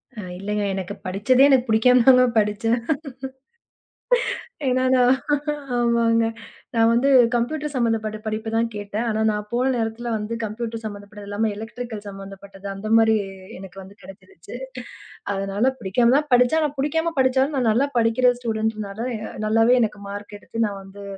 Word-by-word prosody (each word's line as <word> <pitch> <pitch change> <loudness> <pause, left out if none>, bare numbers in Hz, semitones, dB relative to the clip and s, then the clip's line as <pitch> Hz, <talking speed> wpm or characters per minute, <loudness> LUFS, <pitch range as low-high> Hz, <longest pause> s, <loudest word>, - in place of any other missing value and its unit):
அ - - -8 0.2
இல்லைங்க. 210 +2 -2
எனக்குப் 190 -2 -6
படிச்சதே 230 +8 +3
எனக்குப் 260 -3 +3
புடிக்காமதாங்க 250 +3 +5
படிச்சேன். 215 +3 +1 1.9
ஏன்னா 255 0 +2
நான். 250 0 +5 0.6
ஆமாங்க. 235 -1 +2 0.5
நான் 225 0 +4
வந்து 250 +4 +3 0.3
கம்ப்யூட்டர் 295 +5 -2
சம்பந்தப்பட்ட 225 -3 0
படிப்பு 220 +1 -3
தான் 230 0 +1
கேட்டேன். 205 +3 -4
ஆனா, 220 0 -1
நான் 210 0 -4
போன 255 +2 +1
நேரத்துல 230 +1 -3
வந்து 210 +2 -5
கம்ப்யூட்டர் 225 +1 -5
சம்பந்தப்பட்டது 205 0 -9
இல்லாம 210 +2 -1
எலெக்ட்ரிக்கள் 225 0 -7
சம்பந்தப்பட்ட 195 0 -9
அந்த 215 +2 -6
மாரி 220 -1 +4 0.4
எனக்கு 195 0 -11
வந்து 195 +2 -13
கெடைச்சிருச்சு. 190 +1 -13 0.8
அதுனால 195 +6 0
பிடிக்காமதான் 245 +8 +2
படிச்சேன். 250 +6 +4
ஆனா 295 - 0
பிடிக்காம 320 +4 0
படிச்சாலும் 265 +3 +2
நான் 240 -3 +2
நல்லா 265 +6 +2
படிக்கிற 235 +2 +3
ஸ்டூடண்ட்னால 220 -3 -3 0.5
நல்லாவே 225 +3 +4
எனக்கு 210 -2 -2
மார்க் 205 +1 -8
எடுத்து 230 +2 -3
நான் 200 -1 -4
வந்து 200 +1 -12
225 Hz, 135 wpm, -22 LUFS, 205-245 Hz, 1.9 s, புடிக்காமதாங்க